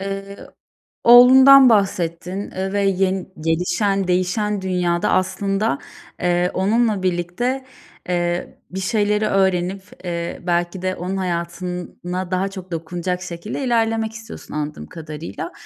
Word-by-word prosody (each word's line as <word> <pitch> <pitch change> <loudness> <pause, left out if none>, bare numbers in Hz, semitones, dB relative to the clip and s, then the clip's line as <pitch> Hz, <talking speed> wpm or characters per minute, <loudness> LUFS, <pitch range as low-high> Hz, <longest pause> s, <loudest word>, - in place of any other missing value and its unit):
eee, 195 0 -5 0.7
oğlundan 260 +2 +9
bahsettin, 190 -2 0
eee, 190 +1 -3
ve 200 - +1
yeni 190 -1 0
gelişen 180 +4 0
değişen 190 +3 0
dünyada 180 -2 0
aslında, 195 -2 0 0.4
eee, 175 0 +1
onunla 210 0 +1
birlikte, 185 +10 -1 0.4
eee, 175 0 -2
bir 190 - -4
şeyleri 210 +1 +1
öğrenip, 190 -1 +1 0.2
eee, 170 -1 -4
belki 175 +1 0
de 185 0 -1
onun 185 +2 -4
hayatına 180 +1 -4
daha 185 +1 0
çok 190 -2 -9
dokunacak 175 +2 -3
şekilde 180 +8 -5
ilerlemek 225 -2 +1
istiyorsun 225 0 -10
anladığım 150 0 -4
kadarıyla. 155 - -7
185 Hz, 115 wpm, -20 LUFS, 175-205 Hz, 0.7 s, oğlundan